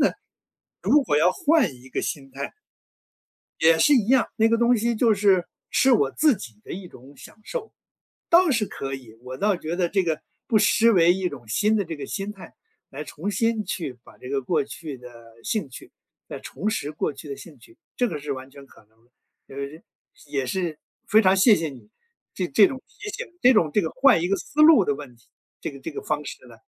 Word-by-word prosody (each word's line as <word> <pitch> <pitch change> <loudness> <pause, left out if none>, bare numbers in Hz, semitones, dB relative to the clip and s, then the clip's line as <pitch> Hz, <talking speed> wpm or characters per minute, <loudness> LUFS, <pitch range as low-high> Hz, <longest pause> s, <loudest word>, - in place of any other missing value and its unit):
呢， - - +4 0.7
如 295 0 +4
果 150 - 0
要 175 +4 +4
换 285 - +2
一 125 +1 -16
个 - - -2
心 135 -2 -4
态 140 +1 -5 1.1
也 160 0 +5
是 295 - +5
一 220 -6 +2
样， 260 0 +4
那 225 0 +4
个 230 - +2
东 235 +1 +4
西 235 +2 0
就 225 0 +3
是 195 -3 +3 0.2
是 265 - +4
我 140 - +3
自 300 -6 +3
己 115 - -11
的 - - -10
一 185 0 -7
种 135 +1 -16
享 - - -13
受。 465 - -6 0.6
倒 345 -1 +5
是 230 -5 +1
可 135 -6 -6
以， 120 -5 -9
我 130 +1 -8
倒 205 -1 +2
觉 165 0 -4
得 175 -1 0
这 195 0 +1
个， 160 -2 -2 0.3
不 225 - +3
失 230 +2 +4
为 175 -3 +5
一 185 -1 -1
种 125 -6 -11
新 210 - +2
的 205 - +1
这 165 -1 -6
个 140 -2 -7
心 200 +5 -4
态， 195 -3 -13 0.4
来 145 +3 -7
重 185 +7 -5
新 225 +2 0
去 135 -9 -4
把 - - -17
这 125 - -10
个 135 -1 -1
过 150 +3 0
去 145 -1 -8
的 125 0 -12 0.3
兴 205 -11 -2
趣 130 - -12 0.4
来 - - -7
重 210 - -4
拾 155 -9 -3
过 150 - -2
去 140 +2 -11
的 140 - -4
兴 160 -5 -13
趣， 115 - -19 0.2
这 245 - +1
个 155 -9 -5
是 145 0 -5
完 130 0 -6
全 140 0 -13
可 105 - -20
能 110 +2 -33
的。 125 - -35 0.4
呃， 140 +4 -6 0.5
也 140 -2 -2
是， 170 +1 -2 0.3
非 220 +1 +5
常 190 -1 +4
谢 205 +3 +6
谢 160 -2 -2
你， 135 - -14 0.5
这 180 -2 -2
这 195 +8 +6
种 260 - -6
提 415 0 -9
醒， - - -5 0.2
这 250 +1 +6
种 165 -8 +3
这 210 - +3
个 160 - -2
换 260 -10 +4
一 175 - 0
个 200 - +2
思 300 +2 -2
路 305 -10 +8
的 145 - +1
问 140 -4 -10
题， 115 - -28 0.3
这 - - -4
个 140 - -11
这 165 - -6
个 - - -6
方 150 -1 -2
式 - - -9
呢， 115 - -15
175 Hz, 245 characters per minute, -24 LUFS, 140-220 Hz, 1.1 s, 路